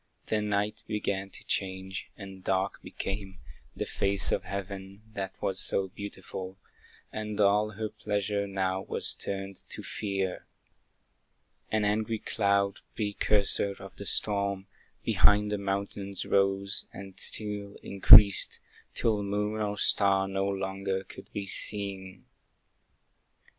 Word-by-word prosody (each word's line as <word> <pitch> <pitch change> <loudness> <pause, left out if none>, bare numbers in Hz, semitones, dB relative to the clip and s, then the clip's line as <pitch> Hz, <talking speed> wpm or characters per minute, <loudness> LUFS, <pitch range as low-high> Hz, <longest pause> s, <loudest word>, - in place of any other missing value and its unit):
The 110 -1 0
night 105 0 -1
began 100 -2 -2
to - - -6
change, 95 0 -3
and 95 -2 -10
dark 95 +1 0
became 95 -1 -5 0.4
The - - -2
face 100 0 +1
of 90 - 0
heaven, 100 +1 -6
that 95 -2 -5
was 95 -1 -1
so 95 -1 +1
beautiful, 95 -1 -7 0.6
And 105 -1 -4
all 105 +1 +3
her 110 +2 -3
pleasure 100 -1 -2
now 95 -1 -1
was - - +3
turned 95 -1 -5
to - - -5
fear. 95 -3 -3 1.2
An 110 -1 +1
angry 110 +2 0
cloud, 100 -2 +1 0.2
precursor 100 -1 +1
of 95 -1 -11
the 100 - -7
storm, 100 -1 +1 0.4
Behind 105 0 +4
the 105 - -1
mountains 100 0 -3
rose, 100 0 +1
and 95 -1 -10
still 105 -2 0
increased, 100 0 +7 0.4
Till 110 -3 +1
moon 105 +2 -1
or 105 -1 -1
star 95 -1 +3
no 95 0 -1
longer 95 0 -2
could - - -12
be 100 - -4
seen. 95 -1 0
100 Hz, 120 wpm, -29 LUFS, 95-105 Hz, 1.2 s, increased